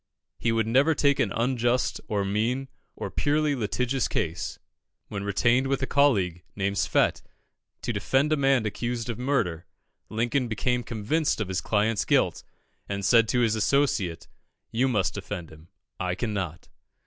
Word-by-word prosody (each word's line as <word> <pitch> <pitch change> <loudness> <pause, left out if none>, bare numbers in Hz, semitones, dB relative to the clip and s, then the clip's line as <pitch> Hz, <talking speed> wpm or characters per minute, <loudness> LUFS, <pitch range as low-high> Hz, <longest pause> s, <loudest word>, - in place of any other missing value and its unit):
He 115 - +1
would 115 -1 +1
never 135 +8 +3
take 140 -1 +2
an 100 - +1
unjust, 120 +1 0
or 105 -3 0
mean, 115 +7 -1 0.3
or - - -5
a - - -17
purely 150 0 +1
litigious 125 +2 0
case. 80 +1 -2 0.5
When 100 -1 -4
retained 120 +6 +2
with 135 0 0
a - - +3
colleague, 100 -13 +2
named 100 0 -1
Swett, - - +2 0.6
to - - -1
defend 140 +4 +1
a - - +4
man 135 -5 +2
accused 120 +2 -2
of 115 - -7
murder, 110 - -1 0.4
Lincoln 120 +4 0
became 125 +3 0
convinced 120 +8 -1
of 105 -3 -2
his 95 -1 -1
client's 105 +1 +1
guilt, - - +2 0.5
and 100 -1 -2
said 115 +1 +5
to 125 +3 +1
his 115 -3 +3
associate 110 - +1 0.4
"You 125 +4 +2
must 105 -8 +1
defend 85 -3 -6
him 80 +1 -15 0.3
I 90 -1 -1
cannot." 95 -6 -3
115 Hz, 160 wpm, -26 LUFS, 100-130 Hz, 0.6 s, said